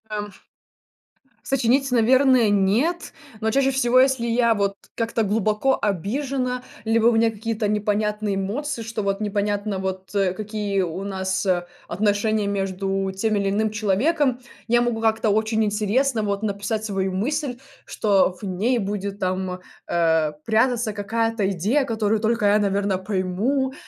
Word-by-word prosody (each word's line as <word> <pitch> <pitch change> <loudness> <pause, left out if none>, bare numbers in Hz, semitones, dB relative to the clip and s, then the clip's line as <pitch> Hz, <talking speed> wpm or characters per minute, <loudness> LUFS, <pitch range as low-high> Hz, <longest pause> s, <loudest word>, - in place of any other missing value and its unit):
А, 210 -1 -3
уф 205 -2 -16 1.0
Сочинить, 270 +1 +1
наверное, 250 0 +4
нет, 215 - +1 0.3
но 220 0 +1
чаще 270 +1 +2
всего, 255 -1 +3
если 260 -2 +3
я 235 -1 +2
вот 200 -1 -1 0.2
как-то 230 0 -1
глубоко 215 +5 +1
обижена, 250 - -2 0.2
либо 225 +1 +3
у - - +6
меня 225 0 +3
какие-то 220 0 -3
непонятные 210 0 0
эмоции, 235 +8 -3
что 225 -1 -4
вот, 195 0 -1
непонятно 205 -1 -1
вот, 190 +1 -5
э, 195 -2 +2
какие 210 -1 -2
у 180 +2 -4
нас 190 -1 -2 0.4
отношения 205 +2 +1
между 195 -1 -2
тем 215 +3 -1
или 200 -1 0
иным 215 +2 0
человеком. 245 - +1 0.3
Я 240 +1 +4
могу 240 -2 -1
как-то 220 -1 +2
очень 220 +1 +1
интересно 215 +4 +1
вот 200 0 -2
написать 210 +1 -2
свою 195 -2 -1
мысль, 250 - -2 0.3
что 195 -3 +1
в - - -14
ней 205 +6 0
будет 200 -1 -4
там, 185 0 -2 0.3
э, 160 -2 +2
прятаться 225 0 +1
какая-то 220 0 -1
идея, 210 - +1
которую 220 -3 0
только 225 -1 +1
я 205 +1 +5
наверно, 200 -1 0
пойму. 210 +8 -1
215 Hz, 145 wpm, -23 LUFS, 195-235 Hz, 1.0 s, у